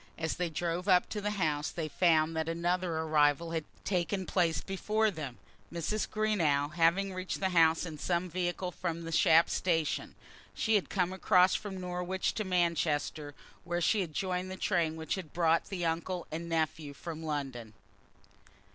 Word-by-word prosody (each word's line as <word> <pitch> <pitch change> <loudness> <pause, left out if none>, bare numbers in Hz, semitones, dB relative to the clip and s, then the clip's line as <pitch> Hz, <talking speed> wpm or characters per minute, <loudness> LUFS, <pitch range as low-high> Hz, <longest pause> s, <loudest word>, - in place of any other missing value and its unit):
As 160 0 -2
they 180 -1 -1
drove 170 +3 -2
up 180 -2 +5
to 210 - -3
the 205 - -2
old 210 0 -2
house, 150 -5 0
they 160 -2 -4
found 160 +1 +2
that 160 0 -1
another 175 0 0
arrival 155 0 +2
had 160 -2 -2 0.2
taken 185 0 -1
place 170 -4 +1
before 215 +3 0
them, 145 -8 -6 0.3
Mrs. 170 +6 -2
Greenow 160 -10 +1
having 175 +4 +2
reached 185 0 -4
the 190 - +1
house 165 -1 +4
in 155 -3 -7
some 175 +2 0
vehicle 180 +1 -2
from 170 -2 -4
the 165 - -6
Shap 165 +1 +5
station. 165 -4 -1 0.4
She 220 - +1
had 205 -3 +2
come 185 -1 0
across 185 -1 +4
from 195 -3 -3
Norwich 180 +1 -2
to 220 - -2
Manchester, 160 -5 0 0.3
where 175 0 -2
she 205 +4 +2
had 170 -4 -4
joined 185 -1 -2
the 185 - -6
train 170 -6 +1
which 160 0 -3
had 185 -6 -5
brought 165 -1 +2
the 180 -3 -3
uncle 170 +2 -2
and 165 +2 -5
nephew 155 -3 -1
from 165 +1 -7
London. 135 -8 -4
170 Hz, 175 wpm, -31 LUFS, 160-185 Hz, 0.4 s, up